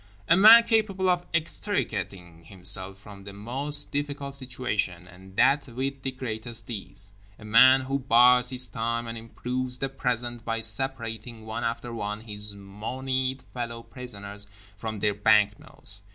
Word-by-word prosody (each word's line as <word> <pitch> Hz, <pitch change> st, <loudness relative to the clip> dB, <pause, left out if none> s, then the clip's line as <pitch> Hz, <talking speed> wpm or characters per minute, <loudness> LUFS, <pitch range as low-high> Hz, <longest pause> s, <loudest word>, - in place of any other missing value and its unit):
A 165 Hz, -, +6 dB
man 220 Hz, +5 st, +9 dB
capable 215 Hz, -5 st, +1 dB
of 180 Hz, 0 st, -2 dB
extricating 95 Hz, -, -2 dB
himself 95 Hz, +1 st, +1 dB
from 100 Hz, 0 st, -13 dB
the 100 Hz, 0 st, -10 dB
most 135 Hz, +8 st, +1 dB
difficult 145 Hz, -1 st, -4 dB
situation; 120 Hz, -10 st, -3 dB
and 95 Hz, +1 st, -15 dB
that 135 Hz, +4 st, +3 dB
with 135 Hz, +3 st, -4 dB
the 135 Hz, -, -2 dB
greatest 120 Hz, -3 st, -5 dB
ease. 100 Hz, -1 st, -6 dB, 0.2 s
A 110 Hz, -, -13 dB
man 130 Hz, +5 st, +7 dB
who 135 Hz, +1 st, -2 dB
bides 125 Hz, 0 st, +5 dB
his 125 Hz, -1 st, +4 dB
time; 115 Hz, +2 st, -3 dB
and 115 Hz, 0 st, -6 dB
improves 125 Hz, +2 st, -3 dB
the 135 Hz, +1 st, -2 dB
present 120 Hz, -3 st, -3 dB
by 115 Hz, 0 st, -2 dB
separating, 115 Hz, -1 st, -2 dB
one 110 Hz, -, -5 dB
after 115 Hz, +1 st, -3 dB
one, 105 Hz, -1 st, -4 dB
his 105 Hz, -2 st, -4 dB
monied 130 Hz, +6 st, -4 dB
fellow 115 Hz, -1 st, -5 dB
prisoners 105 Hz, -6 st, -5 dB, 0.3 s
from 110 Hz, +1 st, -5 dB
their 105 Hz, -, +2 dB
banknotes. 105 Hz, -1 st, +1 dB
115 Hz, 145 wpm, -26 LUFS, 105-130 Hz, 0.3 s, man